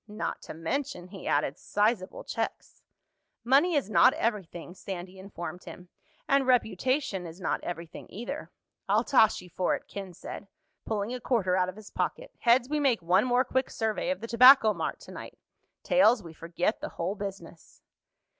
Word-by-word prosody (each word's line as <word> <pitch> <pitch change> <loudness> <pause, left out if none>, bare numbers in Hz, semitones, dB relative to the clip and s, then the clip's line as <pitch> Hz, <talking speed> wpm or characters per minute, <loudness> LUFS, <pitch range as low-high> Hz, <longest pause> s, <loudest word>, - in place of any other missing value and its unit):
Not 210 +1 -4
to - - -9
mention," 180 - -3
he 195 -2 -9
added, 145 -1 0
"sizable 205 -2 0
checks." - - -5 0.6
"Money 285 +8 +4
is 280 -8 +1
not 250 +4 +5
everything," 180 -6 -3
Sandy 185 0 -7
informed 180 -3 -8
him. 180 0 -11 0.4
"And 275 -1 +3
reputation 250 - +1
is 165 +3 -11
not 175 - -2
everything, 170 -1 -7
either." 240 +8 -6 0.4
"I'll - - +3
toss 225 -6 +4
you 180 - -14
for 180 - 0
it," - - -10
Ken 195 -3 -8
said, 200 - -8 0.4
pulling 215 +1 -2
a 250 - -5
quarter 205 -7 +1
out 185 -1 +1
of 185 - -8
his 215 -1 -12
pocket. - - -3
"Heads, 240 +1 +4
we 300 +2 -1
make 255 -10 +2
one 185 +6 +3
more 250 0 +3
quick 260 +1 0
survey 220 +3 -2
of 275 - -2
the 230 - -5
Tobacco 240 -2 +7
Mart 165 -4 -3
tonight. - - -10 0.5
Tails, 240 -5 +4
we 165 -2 -10
forget 170 +6 -2
the - - -4
whole 175 +3 -1
business." 195 -5 -9
210 Hz, 170 wpm, -28 LUFS, 180-250 Hz, 0.6 s, Tobacco